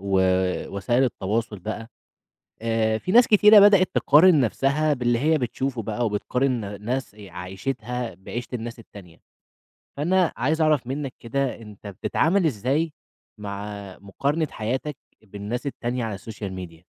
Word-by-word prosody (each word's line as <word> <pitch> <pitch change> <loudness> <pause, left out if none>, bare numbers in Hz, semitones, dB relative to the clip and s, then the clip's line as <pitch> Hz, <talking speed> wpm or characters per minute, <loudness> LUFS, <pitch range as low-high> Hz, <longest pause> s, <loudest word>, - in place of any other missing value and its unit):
ووسائل 95 +4 +1
التواصُل 110 -1 -2
بقى 110 +4 -6 0.7
آآ، 110 -1 +1
في 185 - -3
ناس 240 +2 +7
كتيرة 210 0 +8
بدئت 200 -2 +6
تقارن 160 +1 +6
نَفْسها 140 +5 +1
باللي 120 -2 +1
هي 155 +4 +2
بتشوفه 125 0 -2
بقى 110 +3 -2
وبتقارن 110 -1 -1
ناس 125 -1 -3
عيشتها 105 +5 -5
بعيشة 115 +6 -7
الناس 115 0 -5
التانية، 95 -7 -14 0.8
فأنا 175 +4 +2
عايز 155 +7 0
أعرَف 155 -6 +2
منك 135 0 -4
كده 135 +3 -2
أنت 105 -1 -12
بتتعامل 160 - +1
إزاي 145 +5 0 0.5
مع 100 0 -6 0.3
مقارنة 140 +11 -1
حياتك 130 +6 -3 0.3
بالناس 105 +5 -6
التانية 125 -2 -3
على 110 -2 -3
السوشيال 100 -1 -7
ميديا؟ 90 -3 -9
120 Hz, 125 wpm, -24 LUFS, 105-140 Hz, 0.8 s, كتيرة